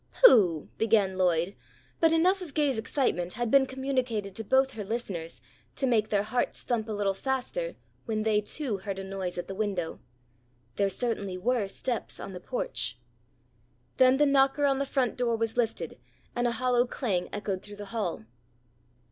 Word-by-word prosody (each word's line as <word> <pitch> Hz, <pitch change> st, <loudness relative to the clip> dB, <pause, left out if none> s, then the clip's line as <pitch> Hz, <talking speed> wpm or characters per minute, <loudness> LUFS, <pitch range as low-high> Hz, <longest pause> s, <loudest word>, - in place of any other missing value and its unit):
"Pooh!" 190 Hz, -, +6 dB
began 210 Hz, -4 st, +3 dB
Lloyd, 180 Hz, 0 st, +1 dB, 0.4 s
but 325 Hz, -1 st, +5 dB
enough 365 Hz, +4 st, +3 dB
of 320 Hz, -7 st, -8 dB
Gay's 285 Hz, -6 st, +2 dB
excitement 180 Hz, -, 0 dB
had 240 Hz, -2 st, -2 dB
been 275 Hz, -1 st, +6 dB
communicated 255 Hz, -7 st, -2 dB
to 225 Hz, -, -5 dB
both 265 Hz, +4 st, +3 dB
her 215 Hz, -, -5 dB
listeners 195 Hz, -7 st, -4 dB, 0.3 s
to 270 Hz, -, 0 dB
make 225 Hz, -4 st, +2 dB
their 205 Hz, -1 st, +2 dB
hearts 245 Hz, +3 st, -1 dB
thump 225 Hz, -2 st, -1 dB
a -, -, -2 dB
little 205 Hz, -2 st, 0 dB
faster, 265 Hz, -, -2 dB, 0.3 s
when 215 Hz, -2 st, -1 dB
they, 215 Hz, -1 st, +3 dB
too, 235 Hz, 0 st, -2 dB
heard 195 Hz, 0 st, -5 dB
a 195 Hz, -, -4 dB
noise 190 Hz, -2 st, -4 dB
at 175 Hz, -, -4 dB
the 195 Hz, -, -5 dB
window. 190 Hz, -5 st, -2 dB, 0.8 s
There 200 Hz, +6 st, +2 dB
certainly 200 Hz, -4 st, -2 dB
were 225 Hz, +2 st, +1 dB
steps 235 Hz, +4 st, -3 dB
on 195 Hz, -, -7 dB
the 180 Hz, -, -6 dB
porch. 125 Hz, -, -3 dB, 1.0 s
Then 260 Hz, 0 st, +6 dB
the 295 Hz, -, +5 dB
knocker 275 Hz, +1 st, +3 dB
on 275 Hz, -1 st, +2 dB
the 275 Hz, -, -1 dB
front 260 Hz, -4 st, 0 dB
door 240 Hz, -2 st, +1 dB
was 225 Hz, 0 st, -1 dB
lifted 235 Hz, -2 st, -1 dB, 0.4 s
and 240 Hz, 0 st, +1 dB
a -, -, +1 dB
hollow 250 Hz, 0 st, +2 dB
clang 205 Hz, -10 st, -1 dB
echoed 200 Hz, -2 st, -3 dB
through 205 Hz, 0 st, -10 dB
the 205 Hz, 0 st, -8 dB
hall. 180 Hz, -, -2 dB
225 Hz, 175 wpm, -28 LUFS, 195-260 Hz, 1.0 s, Pooh